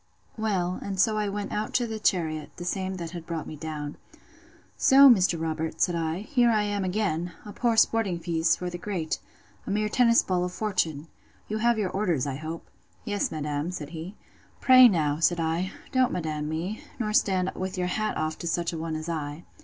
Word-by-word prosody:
Well, 190 -5 -1
and 195 -1 -4
so 215 +3 +3
I 210 -1 0
went 205 0 -4
out 215 +1 -3
to 245 - +3
the 220 -1 -5
chariot, 160 -7 0
the 175 - -7
same 190 +1 -2
that 170 -2 -6
brought 165 -3 -4
me 155 - -7
down. 150 -1 -6 0.8
So, 275 +1 +7
Mr. 185 -8 +5
Robert, 160 0 -3
said 175 - +2
I, 165 +1 -2
here 240 +1 +2
I 215 -2 +3
am 205 -1 -1
again! 180 -3 -1
a 205 - -8
poor 235 -2 +1
sporting 220 -6 +3
piece 165 -1 +1
for 180 0 -5
the 175 - -6
great! 175 -5 -3 0.5
a - - -3
mere 210 +1 0
tennis 235 0 +4
ball 180 -1 0
of 180 0 -3
fortune! 170 -7 -1 0.4
You 215 +1 -2
have 235 +1 +3
your 200 -4 -1
orders, 175 -9 0
I 135 -2 -3
hope. 160 +2 -6 0.4
Yes, 205 -3 -1
madam, 150 0 -2
said 155 -5 -6
he. 170 +5 -7 0.4
Pray, 255 -1 +8
now, 155 -7 +1
said 170 +1 +2
I, 165 +4 -1 0.2
don't 255 -1 +3
madam 155 -3 -3
me, 170 +7 -4
nor 215 -3 -2
stand 190 -3 +2
with 190 +1 -4
your 180 - 0
hat 215 +4 -1
off 155 0 -2
to 170 - -4
such 170 0 -1
a 165 - -4
one 160 0 -3
as 155 +1 -5
I. 155 -1 -4
180 Hz, 200 wpm, -27 LUFS, 160-210 Hz, 0.8 s, Pray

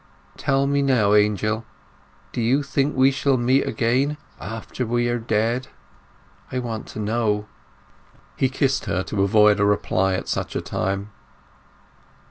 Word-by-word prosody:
Tell 135 0 +1
me 140 0 +1
now, 120 -7 +3
Angel, 105 +1 +2 0.7
do - - -3
you 130 +6 +2
think 140 +1 0
we 130 +1 +5
shall 140 0 +1
meet 130 +3 +2
again 135 +4 +1 0.2
after 110 +5 -5
we 120 +1 0
are 120 0 0
dead? 115 +3 0 0.8
I 130 - -2
want 115 -3 -4
to - - -8
know." 105 -1 0 0.9
He 130 - +1
kissed 135 0 0
her 95 - -1
to 100 0 -2
avoid 105 +1 +4
a - - +3
reply 95 -2 +1
at - - -4
such - - -3
a - - +1
time. 100 +2 -3
115 Hz, 145 wpm, -23 LUFS, 105-130 Hz, 0.9 s, we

